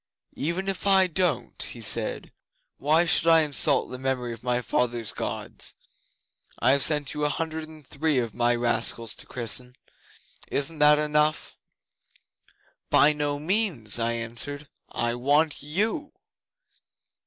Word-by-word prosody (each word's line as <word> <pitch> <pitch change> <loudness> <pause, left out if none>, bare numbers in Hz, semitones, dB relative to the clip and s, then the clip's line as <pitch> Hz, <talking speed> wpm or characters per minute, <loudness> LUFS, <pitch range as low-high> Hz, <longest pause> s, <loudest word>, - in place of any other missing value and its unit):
'"Even 170 +6 -3
if 195 +1 -3
I 190 -1 +6
don't," 170 -8 -1
he 120 - -2
said, 110 - 0 0.5
"why 155 +4 +3
should 165 0 +2
I 165 -1 +6
insult 150 -3 +2
the 130 - -7
memory 130 -2 -2
of 115 - -11
my 125 0 0
fathers' 120 -2 -1
Gods? - - -5 0.8
I 130 - +3
have 140 0 +3
sent 150 -3 +3
you 150 - -3
a 150 - +2
hundred 160 +1 -4
and 155 -2 -14
three 150 +2 -1
of 115 -3 -1
my 120 0 +1
rascals 120 -1 0
to - - -10
christen. 125 +1 -3 0.7
Isn't 150 +3 -2
that 150 0 +6
enough?" 150 0 0 1.4
'"By 150 +1 +5
no 145 -1 -2
means," 155 - 0
I 115 0 0
answered. 120 +5 -5 0.2
"I 120 0 -1
want 145 +5 +1
you." 215 - -2
145 Hz, 140 wpm, -25 LUFS, 120-160 Hz, 1.4 s, I